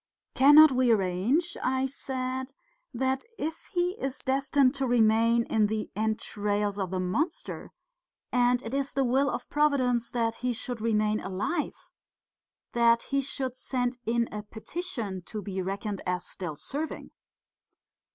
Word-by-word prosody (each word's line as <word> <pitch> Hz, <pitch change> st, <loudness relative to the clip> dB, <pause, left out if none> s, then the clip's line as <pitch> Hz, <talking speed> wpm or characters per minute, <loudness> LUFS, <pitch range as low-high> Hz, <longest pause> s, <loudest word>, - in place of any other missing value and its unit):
"Cannot 295 Hz, +3 st, +8 dB
we 255 Hz, -1 st, +2 dB
arrange," 215 Hz, -, +1 dB
I 260 Hz, +1 st, +1 dB
said, 260 Hz, -1 st, -4 dB, 0.4 s
"that 265 Hz, +1 st, -1 dB
if 320 Hz, +2 st, -5 dB
he 355 Hz, 0 st, +1 dB
is 270 Hz, 0 st, -2 dB
destined 270 Hz, 0 st, +2 dB
to 270 Hz, -2 st, -1 dB
remain 230 Hz, 0 st, +4 dB
in 215 Hz, -2 st, +2 dB
the 215 Hz, 0 st, -3 dB
entrails 210 Hz, -1 st, -1 dB
of 190 Hz, -2 st, -1 dB
the 185 Hz, 0 st, -2 dB
monster 285 Hz, -, -2 dB, 0.6 s
and 245 Hz, 0 st, +3 dB
it 230 Hz, -, -6 dB
is 275 Hz, 0 st, -1 dB
the 275 Hz, -, +3 dB
will 265 Hz, +3 st, +2 dB
of -, -, -4 dB
Providence 255 Hz, -6 st, +2 dB
that 230 Hz, -2 st, 0 dB
he 250 Hz, 0 st, 0 dB
should 240 Hz, 0 st, -4 dB
remain 215 Hz, -1 st, +1 dB
alive, 205 Hz, -, -3 dB, 0.8 s
that 235 Hz, 0 st, +4 dB
he 275 Hz, 0 st, 0 dB
should 260 Hz, -2 st, -3 dB
send 250 Hz, -1 st, -2 dB
in 235 Hz, 0 st, +1 dB
a 210 Hz, -, -4 dB
petition 220 Hz, -, -5 dB
to 215 Hz, -, -5 dB
be 195 Hz, -2 st, -4 dB
reckoned 200 Hz, +2 st, -3 dB
as 180 Hz, 0 st, -1 dB
still 170 Hz, -5 st, -5 dB
serving?" 295 Hz, -, -5 dB
245 Hz, 140 wpm, -28 LUFS, 215-270 Hz, 0.8 s, Cannot